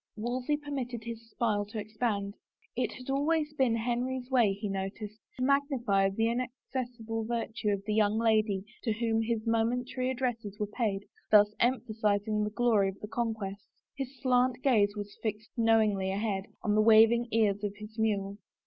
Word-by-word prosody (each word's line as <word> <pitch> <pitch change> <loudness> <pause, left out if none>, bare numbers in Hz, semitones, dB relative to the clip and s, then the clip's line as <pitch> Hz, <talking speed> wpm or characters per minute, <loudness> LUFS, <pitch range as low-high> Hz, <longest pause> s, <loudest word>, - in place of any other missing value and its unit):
Wolsey 250 +6 -1
permitted 260 -6 -5
his 230 0 -8
smile 215 -4 0
to 220 +2 -7
expand. 210 -1 -2 0.4
It 250 - 0
had 255 +1 -6
always 300 +2 +1
been 260 -6 +2
Henry's 245 +2 -2
way, 235 -6 +4
he 205 +2 -4
noticed, 200 +2 -5 0.2
to 255 - -2
magnify 255 -8 +2
the 200 +3 -1
inacces 250 +1 -3
sible 225 0 -3
virtue 230 -2 -2
of 200 -1 -1
the 215 - -1
young 210 0 +3
lady 215 -4 +2 0.2
to 225 - 0
whom 225 0 0
his 225 0 -1
momentary 245 +3 0
addresses 240 -6 -2
were 210 - +1
paid, 205 -2 -2 0.2
thus 210 0 +6
emphasizing 215 -3 +1
the 210 - -1
glory 215 -3 +2
of 195 - -9
the 210 - -7
conquest. 220 -4 -3 0.3
His 270 -1 -6
slant 255 -1 +2
gaze 210 -6 +3
was 205 -1 -7
fixed 215 0 -4
knowingly 220 -5 +3
ahead, 195 -1 -1 0.2
on 210 - +1
the 215 - +4
waving 225 +2 +6
ears 210 -3 +2
of 205 -1 -2
his 215 +2 -10
mule. 200 -2 0
225 Hz, 165 wpm, -30 LUFS, 210-245 Hz, 0.4 s, thus